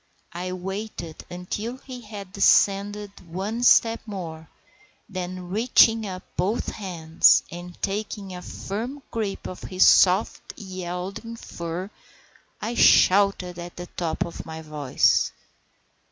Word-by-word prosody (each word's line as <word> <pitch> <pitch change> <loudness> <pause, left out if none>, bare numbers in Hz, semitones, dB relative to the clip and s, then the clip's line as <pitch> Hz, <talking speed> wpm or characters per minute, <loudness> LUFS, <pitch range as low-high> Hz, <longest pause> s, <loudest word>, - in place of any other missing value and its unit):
I 180 +2 -4
waited 185 -2 -6
until 205 +7 -5
he 255 -2 -9
had 205 -4 -9
descended 200 +1 +3 0.2
one 205 +7 -3
step 230 -2 +5
more, 165 -6 -7 0.6
then 185 -2 -5
reaching 225 +1 +4
up 185 -1 -6
both 200 +6 0
hands, 165 -5 +3
and 175 +1 -9
taking 200 -1 -3
a 180 - -7
firm 240 +11 -5
grip 215 -4 -3
of 185 - -7
his 185 0 +3
soft, 185 +3 +4
yielding 185 +3 -6
fur, 175 -2 -6 0.7
I 225 +3 -3
shouted 190 -5 +4
at 175 0 -8
the 175 - -6
top 170 -2 -2
of 170 - -7
my 160 0 -8
voice. 150 -4 +2
190 Hz, 120 wpm, -25 LUFS, 175-210 Hz, 0.7 s, step